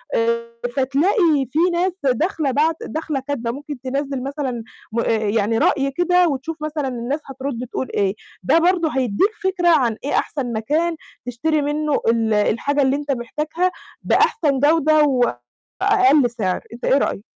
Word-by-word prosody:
آآ 235 0 0 0.2
فتلاقي 290 - +2
في 310 - 0
ناس 360 +2 +1
داخلة 280 - 0
باعت 310 +4 +2
داخلة 310 -3 -3
كاتبة 240 -5 -2
ممكن 285 0 -7
تنزِّل 270 0 -3
مثلًا 270 -5 -3 0.3
م 230 - -1
آآ - - 0
يعني 220 +1 0
رأي 275 +2 +2
كده 355 +3 +3
وتشوف 310 +3 -3
مثلًا 305 -2 -2
الناس 250 +4 -3
هترد 265 -2 -5
تقول 260 - -3
إيه، 200 0 +1 0.3
ده 330 - +4
برضه 345 -1 +2
هيدّيك 260 - +1
فكرة 375 -2 0
عن 250 -9 +3
إيه 285 - -3
أحسن 255 -5 -2
مكان 310 +10 0 0.3
تشتري 295 +6 0
منه 295 0 0
ال 225 -1 +2
الحاجة 235 +7 +1
اللي 265 +1 +2
أنت 290 0 -3
محتاجها، 300 +8 -1 0.3
بأحسن 285 - +2
جودة 310 +1 +4 0.8
وأقل 380 - +4
سعر، 205 -6 -2
أنت 240 - -7
إيه 270 - +4
رأيك؟ 240 - -1
280 Hz, 150 wpm, -20 LUFS, 240-315 Hz, 0.8 s, ده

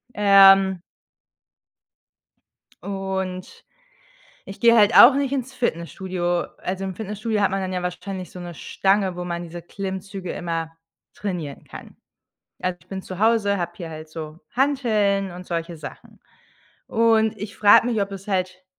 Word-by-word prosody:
Ähm 195 -2 +6 2.0
und 190 -2 -5 0.8
ich 195 - -10
gehe 235 -1 +6
halt 210 0 +5
auch 260 +3 +10
nicht 280 -1 -1
ins 265 -1 -3
Fitnessstudio. 175 -4 -2
Also, 190 +1 -4
im 190 -1 -4
Fitnessstudio 215 +1 -3
hat 200 - +2
man 195 0 -1
dann 185 0 -3
ja 180 -1 -2
wahrscheinlich 185 +1 -5
so 180 - -10
'ne 175 -1 -7
Stange, 195 +2 0
wo 180 - -4
man 170 0 -4
diese 170 0 -9
Klimmzüge 190 0 -6
immer 165 -1 -4 0.4
trainieren 175 -8 -5
kann. - - -12 0.6
Also, 180 -1 -2
ich - - -26
bin 190 -1 -5
zu 185 -1 -8
Hause, 215 -2 +2
habe 175 0 -3
hier 170 -3 -7
halt 155 0 -9
so 155 0 -8
Hanteln 215 -8 +1
und 180 +1 -10
solche 170 0 -4
Sachen. 150 -1 -11 0.7
Und, 220 -1 +2
ich 210 +2 -7
frage 210 +2 +6
mich, 225 -4 0
ob 200 0 -5
es 195 +1 -9
halt 185 -1 -2
190 Hz, 150 wpm, -23 LUFS, 175-210 Hz, 2.0 s, auch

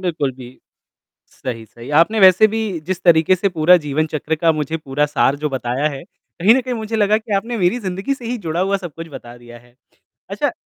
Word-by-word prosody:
बिल्कुल, 160 -7 -1
जी, 125 0 -13 0.7
सही-सही, 115 0 -8
आपने 215 +5 +2
वैसे 190 +3 +7
भी 220 +1 -3 0.3
जिस 185 0 -3
तरीक़े 165 +1 +5
से 200 +2 0
पूरा 175 +1 +4
जीवन 155 0 -1
चक्र 155 +1 -3
का 165 +1 +2
मुझे 155 +1 -3
पूरा 145 -1 -1
सार 145 -1 +1
जो 150 +1 -2
बताया 130 +2 -1
है, 135 -2 -7
कहीं 200 +7 0
न 265 - +2
कहीं 250 0 -4
मुझे 220 0 -4
लगा 210 0 +3
कि 220 -1 -8
आपने 230 +4 -2
मेरी 180 +6 +1
ज़िंदगी 195 +7 -3
से 255 -3 -13
ही 245 0 -3
जुड़ा 170 -2 -3
हुआ 195 +1 +1
सब-कुछ 165 -3 -8
बता 120 -2 -10
दिया 120 0 -13
है, 120 0 -24 0.6
अच्छा - - -1
165 Hz, 210 wpm, -19 LUFS, 145-200 Hz, 0.7 s, वैसे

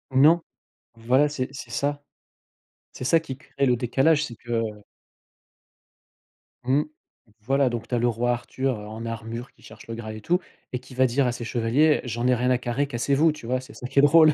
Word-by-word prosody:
Non, 155 +6 +6 0.6
voilà, 130 +6 +3
c'est 135 -3 -3
c'est 130 -4 -9
ça 145 +4 -1 0.9
c'est 130 - -7
ça 165 +5 +4
qui 135 -5 -7
crée 140 -1 -3
le 125 -1 +3
décalage, 135 +6 +2
c'est 120 -5 -6
que 120 0 -2 2.0
Mmh. 135 +4 +2 0.6
Voilà, 135 +3 +2
donc, 115 -1 -4
tu 125 - -1
as - - +1
le 120 - +2
roi 120 +1 +1
Arthur 125 0 -2
en 110 +2 -7
armure 115 +2 -6
qui - - -27
cherche 110 +1 -14
le 115 - -5
Graal 110 -1 -6
et 110 - -9
tout, 175 +11 +2 0.3
et 125 - -2
qui 130 0 -14
va 130 - +4
dire 130 +2 +2
à 125 - +1
ses 125 0 -6
chevaliers: 120 +7 +2
«J'en 120 0 -3
ai 125 - +4
rien 125 +1 0
à 125 - +4
carrer, 125 +3 -1
cassez-vous». 140 +5 +2
Tu 150 -6 -11
vois, 130 +2 0
c'est 130 +2 -12
ça - - -9
qui 140 - +2
est - - +8
drôle 155 +1 +7
125 Hz, 205 wpm, -25 LUFS, 115-140 Hz, 2.0 s, est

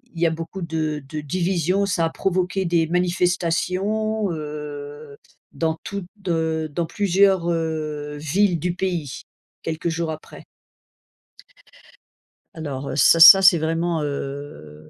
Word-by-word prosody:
il 165 - -6
y - - +5
a 165 - +2
beaucoup 165 +3 -6
de 155 -3 -3
de 150 +1 -5
division. 180 +4 0
Ça 175 -4 0
a 165 - 0
provoqué 185 +1 -1
des 170 -2 +1
manifestations, 180 +4 0
heu, 150 -1 -7 0.3
dans 160 +3 -1
toutes, 200 -2 -5 0.2
heu, 160 -2 -1
dans 165 +3 -2
plusieurs, 190 -3 +2
heu, 155 -3 -3
villes 170 +4 +1
du 180 +2 -2
pays, 175 -7 -3 0.4
quelques 165 +1 -3
jours 165 0 -2
après. 155 - -10 2.1
Alors, 140 -4 -5
ça 165 +4 +5
ça, 170 +4 +11
c'est 180 -3 +7
vraiment, 165 +1 -1
heu, 140 - -7
165 Hz, 125 wpm, -22 LUFS, 150-180 Hz, 2.1 s, ça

